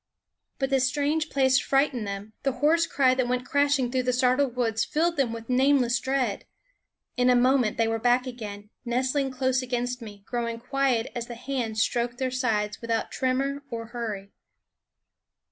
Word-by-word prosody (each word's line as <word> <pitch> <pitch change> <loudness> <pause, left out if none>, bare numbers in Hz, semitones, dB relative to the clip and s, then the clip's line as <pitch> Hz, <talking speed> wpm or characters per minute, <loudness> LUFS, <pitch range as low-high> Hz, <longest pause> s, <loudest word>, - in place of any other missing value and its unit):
But 270 0 -2
the 270 - +4
strange 290 +4 0
place 265 -1 +3
frightened 270 -5 +1
them; 200 +2 -6
the 275 - 0
hoarse 315 +6 +2
cry 260 -2 +3
that 255 -1 0
went 250 0 -1
crashing 285 -3 +2
through 260 0 +1
the 250 0 0
startled 255 +1 +2
woods 225 -3 0
filled 335 +3 0
them 270 -6 +1
with 230 0 -7
nameless 255 -2 +3
dread. 260 -6 -1 0.7
In 250 0 +3
a 250 - +5
moment 250 -2 +3
they 230 -1 +2
were 225 0 -1
back 245 +2 +3
again, 210 -4 -8
nestling 260 +3 0
close 260 0 0
against 245 0 -2
me, 205 -3 -10
growing 235 -1 -3
quiet 260 -1 0
as 235 -1 -4
the 240 - -7
hands 235 -3 -1
stroked 240 0 -1
their 260 0 -1
sides 215 -5 -1
without 230 -1 -2
tremor 270 +2 -1
or 230 -1 -5
hurry. 215 -5 -5
250 Hz, 170 wpm, -26 LUFS, 230-270 Hz, 0.7 s, a